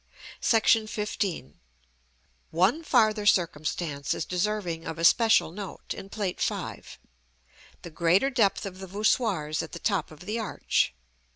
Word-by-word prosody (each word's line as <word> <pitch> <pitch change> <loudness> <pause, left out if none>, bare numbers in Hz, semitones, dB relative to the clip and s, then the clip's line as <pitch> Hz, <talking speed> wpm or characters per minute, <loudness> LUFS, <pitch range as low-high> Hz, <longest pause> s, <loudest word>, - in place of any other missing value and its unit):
§ - - +2
XV. 210 - 0 1.0
One 190 - +2
farther 215 -7 +3
circumstance 155 -4 0
is - - -3
deserving 180 -3 -2
of 165 -1 -5
especial 220 +3 +4
note 195 +1 -7
in 195 - -9
Plate 200 -3 -3
V., - - -2 1.0
the 170 - -8
greater 175 - +2
depth 220 -7 +2
of 190 -1 -7
the 190 - -7
voussoirs 195 -6 0
at - - -8
the - - -5
top 200 +2 -1
of 155 -1 -14
the 215 +3 -3
arch. 190 - 0
195 Hz, 130 wpm, -27 LUFS, 165-215 Hz, 1.0 s, especial